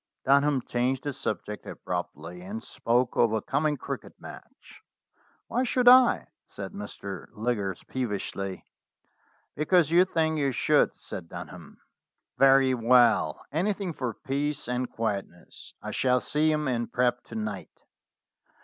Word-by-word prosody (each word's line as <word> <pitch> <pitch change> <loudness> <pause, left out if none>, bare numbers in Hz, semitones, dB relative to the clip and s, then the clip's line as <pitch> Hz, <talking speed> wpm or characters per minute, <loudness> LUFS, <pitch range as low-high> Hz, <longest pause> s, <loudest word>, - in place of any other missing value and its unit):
Dunham 140 -1 +3
changed 125 +2 -1
the 145 -1 -3
subject 105 -2 -4
abruptly, 90 - -5
and 205 +5 -6
spoke 120 +1 0
of 115 -2 +3
a 110 - +2
coming 150 +1 0
cricket - - -7
match. - - -13 0.6
"Why 245 - -1
should 250 -1 +1
I 250 0 +7
?" - - -61
said - - -8
Mr. 100 - -7
Liggers 105 -5 -2
peevishly. 100 -5 -4 0.9
"Because 160 +1 +3
you 175 +2 +6
think 160 -3 0
you 140 -2 +1
should," - - +2
said 85 -2 -7
Dunham. 85 -2 -10 0.6
"Very 135 -1 +6
well. 120 -8 +3
Anything 190 +3 -1
for 125 -7 -4
peace 145 +1 -3
and 125 0 -2
quietness. 100 -6 -5
I - - -4
shall 125 -1 +2
see 155 +4 +1
him 150 -1 0
in 120 -2 -1
prep, 125 +1 0
to 115 - -10
night." 105 -3 -6
125 Hz, 135 wpm, -27 LUFS, 110-150 Hz, 0.9 s, I